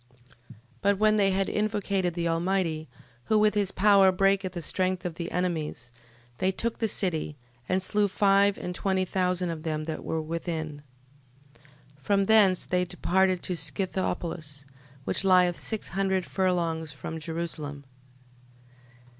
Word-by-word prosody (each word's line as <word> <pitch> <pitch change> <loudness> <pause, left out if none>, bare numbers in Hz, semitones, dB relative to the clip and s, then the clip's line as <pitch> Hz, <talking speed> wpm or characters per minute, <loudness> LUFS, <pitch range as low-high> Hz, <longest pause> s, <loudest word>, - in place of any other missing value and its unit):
12:28. - - -14 0.3
But 200 0 +2
when 215 +1 +3
they 200 -1 +3
had 195 0 +1
invocated 200 -4 -1
the 170 -1 -1
Almighty, 165 -2 -1 0.4
who 215 - +2
with 210 0 +4
his 205 -2 0
power 195 -1 +5
breaketh 195 0 +1
the 175 - -4
strength 185 +2 -1
of 175 - -2
the 170 +1 -5
enemies, 160 -9 -2 0.5
they 185 - +2
took 230 +4 -3
the 225 - +1
city: 160 -7 -2 0.3
and 185 0 +1
slew 205 +2 +2
five 200 0 +3
and 180 - -5
twenty 190 0 0
thousand 180 -1 0
of 160 -2 -6
them 155 -1 -2
that 155 0 -5
were 160 - -2
within. 160 -2 -4 1.2
12:29. - - -28
From 200 +7 +2
thence 200 -4 +5
they 180 0 +1
departed 185 +1 +1
to 180 - -1
Scythopolis, 170 -6 -3 0.4
which - - 0
lieth 180 -2 +4
six 220 -2 -4
hundred 190 0 0
furlongs 170 -4 -1
from 160 +3 -7
Jerusalem. 155 -3 -5
185 Hz, 145 wpm, -27 LUFS, 165-195 Hz, 1.2 s, power